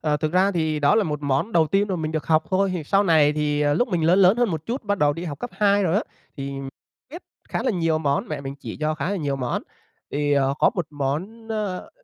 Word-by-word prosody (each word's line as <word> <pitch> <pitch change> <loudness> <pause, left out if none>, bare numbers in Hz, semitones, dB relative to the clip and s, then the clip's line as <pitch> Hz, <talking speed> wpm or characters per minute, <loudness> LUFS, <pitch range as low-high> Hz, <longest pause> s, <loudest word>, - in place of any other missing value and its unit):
Ờ, 150 -1 +1
thực 155 +1 -2
ra 185 +2 +3
thì 160 -3 -1
đó 145 - +4
là 220 -2 +3
một 150 -2 -3
món 140 +10 0
đầu 160 -2 +4
tiên 200 +5 +1
mà 185 - -1
mình 155 -1 -3
được 155 - -3
học 160 0 +3
thôi 195 +1 +2
thì 160 -4 -4
sau 195 +6 +3
này 155 -5 +4
thì, 150 -1 0
ờ, 145 0 +2
lúc 245 - +1
mà - - -10
mình 165 -3 +1
lớn 180 +4 +4
lớn 190 +3 +6
hơn 240 -3 +2
một 160 -2 -4
chút 245 +4 -2
thì 210 - -26
bắt 205 -1 0
đầu 145 0 +3
đi 170 +4 -6
học 145 -4 -5
cấp 245 - -5
2 205 -1 +2
rồi 175 -3 +1
á 205 - +2 0.3
thì 140 0 -5 0.6
biết 340 +4 -9 0.3
khá - - -2
là - - +1
nhiều 165 -5 +1
món, 140 -2 -1
mẹ 150 -2 -4
mình 135 0 -6
chỉ - - -7
cho 155 0 0
khá 155 +5 -3
là 200 - -1
nhiều 145 -5 -2
món. 125 -2 -2 0.5
Thì, 145 0 0
ờ, 140 -1 +2
có - - +4
một 175 -5 -2
món, 160 +11 -4
ơ, 210 -4 -3
160 Hz, 285 wpm, -23 LUFS, 145-195 Hz, 0.6 s, lớn